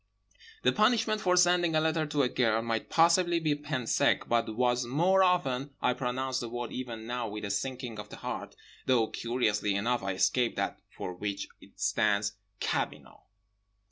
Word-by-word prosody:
The - - +4
punishment 215 0 +2
for 180 -3 +2
sending 175 -2 +4
a - - +5
letter 160 0 +1
to 145 -1 +1
a - - +3
girl 115 -3 +1
might 115 -1 -2
possibly 170 +1 +4
be 155 -2 +1
pain 145 -4 -4
sec, - - +2
but 115 -2 0
was 125 0 +2
more 170 +10 +3
often—I 140 -8 +1
pronounce 130 +1 -2
the 120 - -5
word 120 0 -5
even 115 -3 -6
now 120 0 -3
with 105 0 -5
a 100 - -3
sinking 120 +1 -3
of 105 0 -8
the - - -9
heart, - - -6 0.3
though 120 -4 +3
curiously 105 -4 0
enough 120 +4 0
I 95 0 -2
escaped 95 +6 +1
that - - -2
for 90 - -6
which 100 +2 -4
it - - -19
stands— 105 -1 +1 0.3
cabinot. - - -3
125 Hz, 170 wpm, -30 LUFS, 110-155 Hz, 0.3 s, a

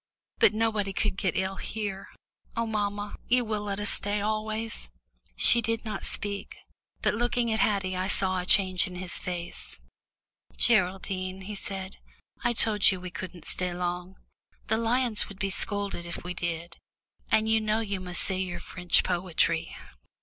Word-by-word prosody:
But - - +5
nobody 215 -3 0
could 210 - 0
get 190 -2 -1
ill 190 +1 -1
here. 205 -3 -4 0.5
Oh, 230 - +1
mamma, 205 -1 -2
you 245 0 +3
will 215 -1 -2
let 200 -1 -3
us 205 - +1
stay 205 +1 0
always." 215 - -2 0.5
She 235 - +6
did 230 +1 -2
not 215 -3 -3
speak, 200 -1 -2 0.5
but - - +3
looking 240 +1 0
at 220 - 0
Haddie 195 -3 +1
I 185 +1 -1
saw 185 -1 +2
a 180 - -4
change 185 -1 +5
in 180 - -9
his 180 -1 -2
face. 175 -1 -5 0.8
"Geraldine," 190 -3 +1
he 200 +3 -6
said, 195 -1 -5 0.5
"I 240 - +3
told 215 -2 +4
you 190 - -1
we 180 0 -7
couldn't 180 -2 -7
stay 180 -1 0
long. 180 +1 -3 0.5
The 220 - +3
lions 235 -1 +2
would 200 - -10
be 195 0 -1
scolded 200 -1 +1
if 170 - -6
we 180 +1 -4
did, 170 -1 -4 0.5
and 220 0 +3
you 220 0 +3
know 215 +1 +1
you 200 -3 -3
must 180 -2 +3
say 190 -1 +1
your 185 -2 -3
French 180 -1 +2
poetry." 170 -2 0
195 Hz, 165 wpm, -28 LUFS, 185-215 Hz, 0.8 s, She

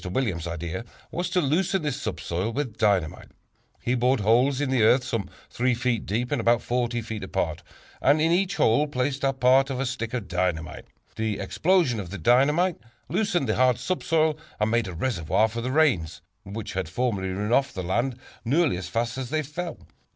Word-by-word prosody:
Williams' 90 -4 -2
idea 85 +4 -4 0.3
was 175 +1 -2
to 180 +1 +1
loosen 175 +4 +1
this 145 -2 -2
subsoil 95 -2 -2
with 130 -3 -3
dynamite. 100 -7 0 0.5
He 120 - +1
bored 125 0 +2
holes 125 +6 +3
in 145 -2 -1
the 130 -3 +2
earth 125 +4 +5
some 115 -6 -3 0.2
3 125 0 +1
feet 120 -2 -1
deep 120 +5 -1
and 145 -5 +1
about 120 +1 +3
40 120 -1 -1
feet 110 -1 -5
apart, - - -2 0.4
and 145 +3 +4
in 160 +2 +3
each 185 +2 +1
hole 120 +7 +3
placed 135 0 -2
a 135 - +3
part 130 +1 +4
of 130 -2 -3
a 135 - 0
stick 125 -2 -3
of 110 -6 -4
dynamite. 90 -3 -2 0.3
The 110 -2 -1
explosion 155 - +1
of 95 -4 -6
the 100 - -6
dynamite 145 - +3 0.3
loosened 180 - 0
the 110 - 0
hard 125 -1 +4
subsoil, 160 0 0 0.2
and 105 +1 +1
made 115 -2 +1
a 90 - -6
reservoir 105 0 +1
for 115 +1 -5
the 125 - -2
rains, 130 - +1 0.2
which 100 +1 -6
had 95 -4 -3
formerly 100 -2 -1
run 105 +4 -2
off 135 +2 +3
the 95 - -5
land 120 +8 -1 0.3
nearly 140 - +2
as 90 -1 -5
fast 115 +6 -2
as 130 -2 -4
they 155 +2 0
fell. 165 +4 -6
120 Hz, 195 wpm, -25 LUFS, 105-140 Hz, 0.5 s, earth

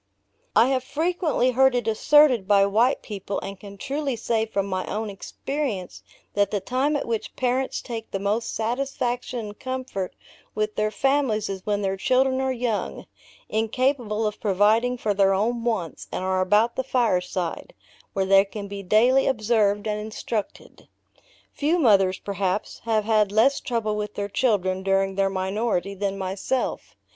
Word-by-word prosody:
I 240 - +6
have 260 -2 +1
frequently 310 -2 0
heard 265 +1 +4
it 240 -2 -1
asserted 250 -1 +4
by 200 -1 +5
white 225 +7 +2
people, 200 -2 -4
and 195 -1 -7
can 200 -1 -11
truly 275 +2 -2
say 225 0 -1
from 200 -3 -1
my 185 -1 -2
own 215 0 -3
experience 215 -1 -4 0.3
that 205 0 +2
the 205 - -1
time 260 +9 0
at 285 - -1
which 230 -2 -3
parents 255 +1 -1
take 225 -2 -6
the - - -2
most 205 +4 -1
satisfaction 245 +1 -2
and 210 -2 -8
comfort 255 -7 -4 0.4
with 215 0 -1
their 215 0 +1
families 265 -4 +1
is 195 +1 -6
when 205 -1 0
their 195 0 -1
children 260 +6 +2
are 265 0 0
young, 240 -4 -2 0.4
incapable 225 0 0
of 210 0 -3
providing 215 +5 +2
for 215 -3 0
their 195 -1 +3
own 230 +4 0
wants, 220 -9 -2
and - - -3
are 185 0 +1
about 210 +5 +2
the 260 - 0
fireside, 185 - -1 0.4
where 195 -1 0
they 195 0 +6
can 200 0 -7
be 200 0 -6
daily 235 +8 +4
observed 215 -4 +1
and 210 0 -1
instructed. 215 0 -5 0.7
Few 310 +4 +1
mothers, 195 - +4
perhaps, 200 0 -2
have 220 -2 +1
had 215 -2 +3
less 225 +7 +3
trouble 230 -5 -2
with 210 0 -4
their 200 0 -3
children 190 -5 +1
during 195 0 +1
their 195 0 +1
minority 195 0 -1
than 195 0 -2
myself. 195 +7 -3
215 Hz, 160 wpm, -24 LUFS, 195-250 Hz, 0.7 s, I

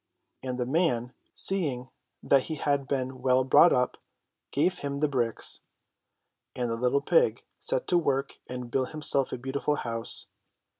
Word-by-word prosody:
And 130 -1 -4
the 125 - -1
man, 130 -4 0 0.2
seeing 140 -10 +1 0.3
that 135 -2 +3
he 160 - -4
had 140 -2 -1
been 130 -1 -3
well 130 0 +3
brought 135 +6 +6
up, 125 0 +1 0.5
gave 165 +6 0
him 140 0 -4
the 150 - +2
bricks, 120 -5 0 0.9
and 120 -2 -2
the - - 0
little 125 +4 +1
pig 485 0 +2 0.2
set - - +1
to 175 - +4
work 140 -4 -1
and 125 -1 -7
built 130 +2 -1
himself 140 -3 +2
a - - -3
beautiful 135 +4 -2
house. 115 -4 -4
135 Hz, 155 wpm, -28 LUFS, 125-145 Hz, 0.9 s, brought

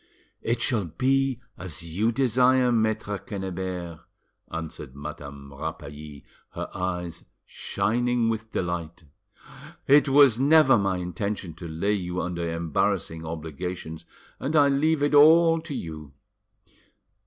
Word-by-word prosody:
"It 120 +1 -1
shall 110 -7 +1
be 130 - 0 0.2
as 90 -2 -3
you 95 +8 0
desire, 125 0 +3
Maitre 110 -3 0
Quennebert," 95 -4 -5 0.5
answered 80 -5 -6
Madame 70 -1 -9
Rapally, 75 0 -8 0.3
her - - -5
eyes 90 -2 -4 0.2
shining 120 +2 0
with 115 0 -3
delight. 85 -1 -3 0.8
"It 145 +1 +5
was 135 -4 +6
never 140 -3 +6
my 95 -2 0
intention 90 +1 -4
to 85 +1 -9
lay 85 +6 -1
you 90 -3 -3
under 85 -2 -3
embarrassing 80 0 -1
obligations, 80 +1 -6 0.3
and 145 +4 -2
I 145 -2 +6
leave 145 +2 +2
it 145 - +1
all 165 +2 +6
to 160 -3 -6
you. 80 - -7
95 Hz, 120 wpm, -26 LUFS, 80-125 Hz, 0.8 s, was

